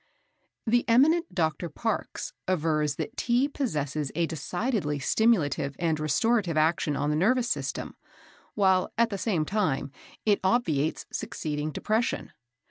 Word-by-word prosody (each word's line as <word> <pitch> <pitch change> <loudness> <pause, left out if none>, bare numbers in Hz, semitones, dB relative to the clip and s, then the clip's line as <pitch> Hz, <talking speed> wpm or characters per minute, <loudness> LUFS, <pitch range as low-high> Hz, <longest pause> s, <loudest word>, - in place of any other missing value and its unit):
The 240 +1 +3
eminent 295 - +4
Dr. 165 -1 0
Parkes 225 +8 -3
avers 155 -5 +1
that 225 - -5
Tea 245 +2 +2
possesses 150 - -2
a 170 - +2
decidedly 170 - -2
stimulative 145 - +1
and 160 -3 0
restorative 170 +4 +1
action 155 -1 +2
on 145 +2 0
the - - +1
nervous 240 +9 +2
system, - - -3 0.6
while, 190 -3 +3
at 230 0 +3
the 200 - -3
same 180 -9 0
time, 155 -9 -1 0.3
it 210 -2 +3
obviates 165 - +1
succeeding 150 0 -3
depression. 220 +8 -1
175 Hz, 130 wpm, -27 LUFS, 150-225 Hz, 0.6 s, eminent